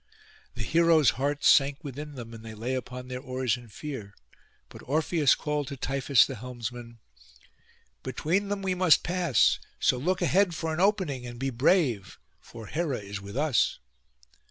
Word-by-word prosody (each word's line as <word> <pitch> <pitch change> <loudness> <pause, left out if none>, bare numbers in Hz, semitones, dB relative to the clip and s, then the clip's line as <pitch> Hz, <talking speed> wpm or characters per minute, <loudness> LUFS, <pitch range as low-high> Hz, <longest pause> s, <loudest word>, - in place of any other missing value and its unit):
The 115 - -4
heroes' 165 +1 +4
hearts 145 +2 -1
sank 140 +3 +4
within 145 +1 -7
them, 115 -2 -8
and 115 -1 -10
they 110 -1 -9
lay 120 +5 -3
upon 125 0 -5
their 125 0 -5
oars 130 -3 -1
in 120 -1 -12
fear; 110 -4 -8 0.5
but - - -13
Orpheus 155 0 +2
called 150 -2 -2
to 140 0 -6
Tiphys 135 0 +3
the 135 - -6
helmsman, 120 0 -7 1.0
'Between 165 +10 -1
them 200 -1 -3
we 190 -1 0
must 180 -3 +4
pass; 175 - +2 0.2
so 125 - +2
look 180 +7 0
ahead 190 -2 +2
for 160 0 -3
an 155 - -3
opening, 180 - +1
and 120 0 -8
be 135 +2 -2
brave, 125 - +1 0.2
for 115 -1 -11
Hera 155 0 -2
is 100 -1 -7
with 100 +4 -8
us. 145 -6 +2
135 Hz, 165 wpm, -27 LUFS, 120-160 Hz, 1.0 s, heroes